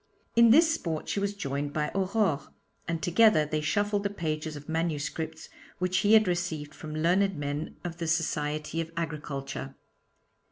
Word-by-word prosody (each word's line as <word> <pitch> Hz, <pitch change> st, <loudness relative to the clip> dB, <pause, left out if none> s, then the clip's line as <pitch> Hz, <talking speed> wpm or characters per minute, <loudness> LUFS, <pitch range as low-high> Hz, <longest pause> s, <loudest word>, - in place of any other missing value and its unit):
In 235 Hz, 0 st, +7 dB
this 320 Hz, +6 st, +6 dB
sport 165 Hz, -, -3 dB
she -, -, -1 dB
was 200 Hz, 0 st, -1 dB
joined 145 Hz, -5 st, -3 dB
by 150 Hz, -1 st, -1 dB
Aurore, 190 Hz, -5 st, +1 dB, 0.4 s
and 165 Hz, -2 st, -2 dB
together 175 Hz, -2 st, +5 dB
they 155 Hz, +1 st, -1 dB
shuffled 205 Hz, +6 st, +1 dB
the 200 Hz, -, -1 dB
pages 155 Hz, -5 st, -3 dB
of 145 Hz, 0 st, -10 dB
manuscripts 160 Hz, 0 st, -2 dB, 0.3 s
which 180 Hz, +1 st, +1 dB
he 210 Hz, +1 st, +4 dB
had 215 Hz, -2 st, +7 dB
received 170 Hz, -4 st, -2 dB
from 155 Hz, -1 st, -7 dB
learned 180 Hz, +4 st, +2 dB
men 145 Hz, +1 st, -3 dB
of 170 Hz, -2 st, -5 dB
the 170 Hz, -1 st, -3 dB
Society 155 Hz, -1 st, -1 dB
of 165 Hz, 0 st, -6 dB
Agriculture. 145 Hz, -4 st, -4 dB
165 Hz, 160 wpm, -28 LUFS, 150-195 Hz, 0.4 s, In